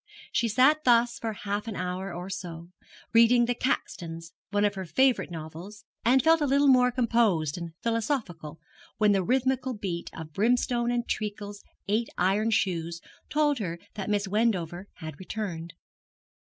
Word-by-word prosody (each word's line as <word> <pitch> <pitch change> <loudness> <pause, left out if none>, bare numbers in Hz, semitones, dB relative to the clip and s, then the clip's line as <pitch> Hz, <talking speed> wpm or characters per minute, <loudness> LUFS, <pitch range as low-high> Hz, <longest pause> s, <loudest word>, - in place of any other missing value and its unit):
She 235 - +1
sat 265 +7 +4
thus 235 -1 +3
for 225 - -2
half 205 +1 -4
an 220 - -4
hour 185 +1 -3
or 175 +2 -6
so, 175 -3 -7 0.4
reading 235 +1 +6
'The 245 - 0
Caxtons,' 170 -9 -3 0.2
one 205 0 +2
of 205 - +1
her 190 -2 -6
favourite 260 +7 +2
novels, 170 +5 -9 0.2
and 255 +2 +4
felt 325 +1 +5
a 295 - +2
little 280 +1 +3
more 250 -2 +6
composed 230 - +1
and 170 -2 -6
philosophical, 220 - -2 0.4
when 210 -1 +4
the 195 -1 +3
rythmical 260 +2 0
beat 180 -5 -4
of 160 -1 -8
Brimstone 240 +4 +1
and 240 0 -1
Treacle's 205 -1 -4 0.2
eight 220 +3 0
iron 200 +5 +2
shoes 170 -6 0 0.3
told 295 -3 +2
her 170 -5 -3 0.2
that 205 -1 -5
Miss 205 -1 0
Wendover 190 -4 0
had 155 -3 -8
returned. 180 -4 -5
210 Hz, 155 wpm, -27 LUFS, 175-240 Hz, 0.4 s, reading